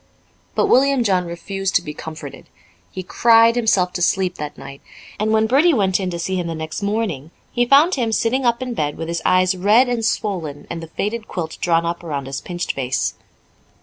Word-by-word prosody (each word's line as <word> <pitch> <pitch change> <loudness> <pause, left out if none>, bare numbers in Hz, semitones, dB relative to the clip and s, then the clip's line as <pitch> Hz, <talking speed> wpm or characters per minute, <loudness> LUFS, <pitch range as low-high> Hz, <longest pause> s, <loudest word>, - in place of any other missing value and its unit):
But - - +3
William 270 -1 +3
John 185 -4 +1
refused 195 +3 -4
to 180 - +3
be 150 - -6
comforted. 155 -2 -9 0.4
He 185 - -7
cried 230 +4 +4
himself 195 -6 +2
to 175 - -4
sleep 185 0 +1
that 150 0 -6
night, 140 0 -10 0.4
and 215 +1 0
when 220 0 +3
Bertie 285 +8 +4
went 190 -4 +2
in 185 -2 -2
to 175 - -4
see 185 +2 -2
him 175 -1 -2
next 160 +4 -5
morning, 200 -9 -2 0.2
he 245 0 +1
found 295 +8 +5
him 235 -4 0
sitting 235 +4 0
up 235 +1 +1
in 250 -1 -4
bed 150 -8 -2
with 165 - -5
his 170 - -2
eyes 185 +1 +3
red 210 +7 +4
and 240 -2 -1
swollen 175 -10 -2
and 170 -1 -5
the 165 - -8
faded 215 +6 -4
quilt 160 -3 -5
drawn 170 -1 +2
up 170 +1 -3
around 145 -5 -4
his 135 +1 -5
pinched 175 -1 -3
face. 130 -1 -1
185 Hz, 205 wpm, -20 LUFS, 165-230 Hz, 0.4 s, found